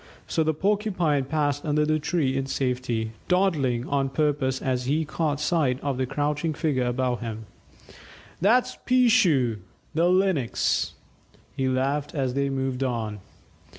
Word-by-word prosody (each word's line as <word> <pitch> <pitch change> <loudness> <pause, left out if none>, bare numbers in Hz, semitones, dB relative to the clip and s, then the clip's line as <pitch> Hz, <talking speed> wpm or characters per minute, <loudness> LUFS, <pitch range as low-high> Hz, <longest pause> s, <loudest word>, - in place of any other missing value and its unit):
So 160 - 0
the 155 -1 0
Porcupine 185 -7 +1
passed 145 0 -1
under 150 -1 +1
the 155 0 +1
tree 145 -4 0
in 135 0 -1
safety, 125 -4 -1 0.2
dawdling 150 -10 +1
on 140 -1 0
purpose 140 -2 0
as 125 -1 -1
he 155 +4 +1
caught 155 -1 -1
sight 150 -5 +1
of 140 -2 -2
the 130 - 0
crouching 150 +3 -1
figure 135 -5 0
above 125 0 0
him. 110 -1 -6 1.0
"That's 245 +6 +3
'Peeshoo' 205 - +3 0.4
the 165 +3 +3
Lynx," 185 -9 +1 0.6
he 130 -1 0
laughed 140 +4 -1
as 130 -3 0
they 140 +1 0
moved 135 -1 -2
on. 115 -5 -2
140 Hz, 140 wpm, -25 LUFS, 130-160 Hz, 1.0 s, That's